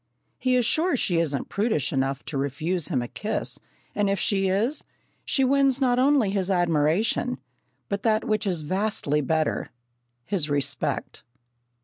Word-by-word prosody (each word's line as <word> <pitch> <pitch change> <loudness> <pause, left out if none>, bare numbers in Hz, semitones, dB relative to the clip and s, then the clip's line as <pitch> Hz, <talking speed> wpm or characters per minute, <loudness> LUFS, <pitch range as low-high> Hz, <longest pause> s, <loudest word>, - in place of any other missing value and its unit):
He 255 -1 +2
is 250 -2 +3
sure 320 +3 +2
she 175 -7 +1
isn't 145 -5 -1
prudish 205 - 0
enough 135 0 -1
to 155 - -6
refuse 155 +5 -1
him 130 -9 0
a - - -5
kiss, 170 - -2 0.3
and 205 -1 +1
if 200 - +1
she 195 0 +1
is, 225 +10 0 0.4
she 270 - +2
wins 275 0 +3
not 250 -2 +2
only 265 -6 +3
his 195 -2 -1
admiration, 175 +7 +1 0.5
but 200 0 -2
that 220 -1 +2
which 215 -2 0
is 175 -5 -1
vastly 185 -4 0
better 155 +2 0 0.6
his 170 -7 -1
respect. 145 -1 -1
195 Hz, 150 wpm, -25 LUFS, 150-230 Hz, 0.6 s, is